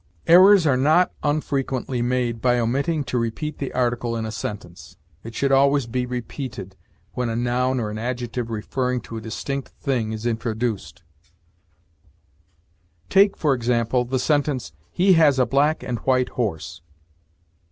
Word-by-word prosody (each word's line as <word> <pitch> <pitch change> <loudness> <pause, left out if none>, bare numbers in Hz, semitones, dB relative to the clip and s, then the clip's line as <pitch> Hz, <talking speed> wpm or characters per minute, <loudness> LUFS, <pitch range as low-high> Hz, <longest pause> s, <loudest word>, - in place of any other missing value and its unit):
Errors 185 +1 +7
are 135 -4 +3
not 155 +7 +3
unfrequently 135 -4 -1
made 120 -2 -1
by 125 -1 +3
omitting 140 +7 0
to 125 -1 -2
repeat 120 +7 -4
the 140 - -4
article 120 -1 -1
in 110 - -3
a 110 - -4
sentence. 100 -5 -7 0.3
It 115 0 -9
should 140 -1 0
always 140 0 +4
be 125 +1 -2
repeated 125 -5 -6 0.4
when 125 -2 -2
a 115 - -2
noun 125 +2 0
or 105 -3 -3
an 110 - -5
adjective 120 0 -4
referring 125 +3 -2
to 115 0 -8
a - - -6
distinct 135 +5 -4
thing 120 -6 -1
is 110 +1 -6
introduced; 110 -4 -3 2.1
take, 200 +1 +4
for 150 -3 +2
example, 120 0 0
the 130 +2 -2
sentence, 135 - 0 0.2
"He 190 - +3
has 155 -5 +4
a 130 - +3
black 145 +4 +1
and 120 -2 -3
white 130 -1 +1
horse." 85 -8 -4
125 Hz, 150 wpm, -23 LUFS, 115-140 Hz, 2.1 s, Errors